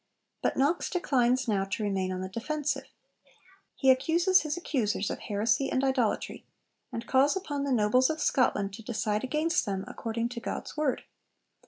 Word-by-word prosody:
But -, -, 0 dB
Knox 290 Hz, +6 st, +1 dB
declines 260 Hz, -7 st, +1 dB
now 200 Hz, -3 st, +1 dB
to 195 Hz, +3 st, -3 dB
remain 190 Hz, -2 st, -1 dB
on 185 Hz, 0 st, -3 dB
the 185 Hz, -, -3 dB
defensive. 290 Hz, +9 st, -2 dB, 0.9 s
He 265 Hz, -1 st, +5 dB
accuses 340 Hz, +8 st, +3 dB
his 305 Hz, +1 st, -3 dB
accusers 220 Hz, -, -1 dB
of -, -, -4 dB
heresy 220 Hz, +6 st, 0 dB
and 260 Hz, -, 0 dB
idolatry, 260 Hz, -5 st, 0 dB, 0.5 s
and 230 Hz, -, -5 dB
calls 275 Hz, +8 st, +3 dB
upon 290 Hz, -7 st, -3 dB
the 280 Hz, -, -1 dB
nobles 250 Hz, +2 st, +3 dB
of 315 Hz, 0 st, -2 dB
Scotland 205 Hz, -9 st, +1 dB
to 210 Hz, -, -8 dB
decide 215 Hz, -1 st, -2 dB
against 310 Hz, +6 st, +1 dB
them 195 Hz, -1 st, -2 dB
according 230 Hz, +1 st, -3 dB
to 240 Hz, -1 st, -6 dB
God's -, -, -5 dB
Word. 300 Hz, -4 st, 0 dB
255 Hz, 165 wpm, -29 LUFS, 210-290 Hz, 0.9 s, He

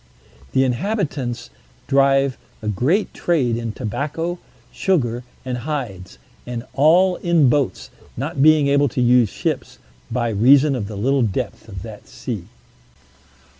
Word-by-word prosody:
The 130 Hz, -, +4 dB
inhabitants 135 Hz, -, -2 dB, 0.3 s
drive 135 Hz, -1 st, +3 dB, 0.3 s
a -, -, -4 dB
great 135 Hz, -, +1 dB
trade 135 Hz, -9 st, +1 dB
in 115 Hz, -1 st, -3 dB
tobacco, 150 Hz, -, -3 dB, 0.3 s
sugar, 125 Hz, -11 st, 0 dB, 0.2 s
and 125 Hz, -1 st, -3 dB
hides, 120 Hz, -11 st, -5 dB, 0.3 s
and 120 Hz, -1 st, -5 dB
all 175 Hz, +6 st, +4 dB
in 170 Hz, -6 st, +3 dB
boats, 140 Hz, 0 st, -1 dB, 0.3 s
not 140 Hz, +3 st, -3 dB
being 155 Hz, -1 st, +5 dB
able 140 Hz, 0 st, +3 dB
to 125 Hz, -, -4 dB
use 125 Hz, -2 st, +4 dB
ships, -, -, -3 dB, 0.3 s
by 120 Hz, 0 st, -1 dB
reason 135 Hz, +7 st, +5 dB
of 105 Hz, -5 st, -3 dB
the 105 Hz, -1 st, -7 dB
little 135 Hz, +6 st, +1 dB
depth 110 Hz, 0 st, -3 dB
of 95 Hz, -2 st, -7 dB
that 110 Hz, -2 st, -10 dB
sea. 120 Hz, -7 st, -6 dB
130 Hz, 130 wpm, -21 LUFS, 115-150 Hz, 0.3 s, being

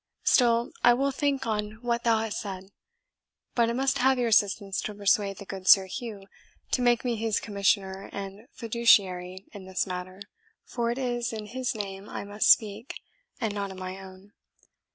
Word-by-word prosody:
Still, 235 Hz, -2 st, +3 dB
I 240 Hz, 0 st, +7 dB
will 275 Hz, +2 st, +1 dB
think 275 Hz, -1 st, -1 dB
on 210 Hz, -1 st, -2 dB
what 235 Hz, -1 st, -1 dB
thou 230 Hz, -1 st, +3 dB
hast 220 Hz, -2 st, -3 dB
said; 195 Hz, -2 st, -7 dB, 0.8 s
but 235 Hz, -1 st, +2 dB
I -, -, -1 dB
must 270 Hz, +2 st, 0 dB
have 265 Hz, +1 st, +4 dB
your 240 Hz, -2 st, +1 dB
assistance 200 Hz, -2 st, +2 dB
to 210 Hz, -, -5 dB
persuade 200 Hz, -1 st, +1 dB
the 200 Hz, -, -9 dB
good 190 Hz, -1 st, -8 dB
Sir 195 Hz, 0 st, +8 dB
Hugh 205 Hz, 0 st, -7 dB, 0.5 s
to 250 Hz, -, +1 dB
make 240 Hz, 0 st, +2 dB
me 240 Hz, -2 st, 0 dB
his 220 Hz, -1 st, 0 dB
commissioner 195 Hz, -1 st, -1 dB
and 200 Hz, +3 st, -7 dB
fiduciary 195 Hz, -5 st, +2 dB
in 200 Hz, -3 st, -9 dB
this 190 Hz, 0 st, -1 dB
matter, 185 Hz, +1 st, -6 dB, 0.4 s
for 235 Hz, -1 st, -2 dB
it 240 Hz, -, -2 dB
is 240 Hz, -2 st, -2 dB
in 215 Hz, -2 st, -6 dB
his 250 Hz, +2 st, -3 dB
name 195 Hz, -1 st, -6 dB
I -, -, -5 dB
must 205 Hz, +1 st, 0 dB
speak, 215 Hz, +3 st, +2 dB, 0.4 s
and 220 Hz, -2 st, -1 dB
not 200 Hz, -1 st, -3 dB
in 190 Hz, -, -9 dB
my 185 Hz, +1 st, -6 dB
own. 190 Hz, +1 st, -13 dB
210 Hz, 180 wpm, -27 LUFS, 195-235 Hz, 0.8 s, Sir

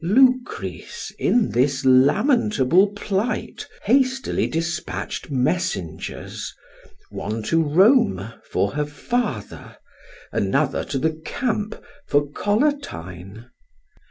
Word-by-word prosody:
Lucrece, 255 Hz, -, +1 dB
in 240 Hz, -3 st, +2 dB
this 130 Hz, +2 st, +1 dB
lamentable 185 Hz, -, +4 dB
plight, 205 Hz, +3 st, -2 dB, 0.2 s
hastily 265 Hz, 0 st, +2 dB
dispatched 165 Hz, 0 st, -3 dB
messengers, 130 Hz, -, -2 dB, 0.6 s
one 110 Hz, +2 st, -4 dB
to 165 Hz, +9 st, +2 dB
Rome 155 Hz, -, +3 dB, 0.2 s
for 100 Hz, -, +1 dB
her 150 Hz, +1 st, -2 dB
father, 145 Hz, -, -3 dB, 0.5 s
another 135 Hz, +8 st, 0 dB
to 140 Hz, -, -3 dB
the 160 Hz, +3 st, -1 dB
camp 220 Hz, -2 st, -2 dB, 0.3 s
for 145 Hz, 0 st, +2 dB
Collatine. 120 Hz, -, -2 dB
160 Hz, 85 wpm, -22 LUFS, -, 0.6 s, lamentable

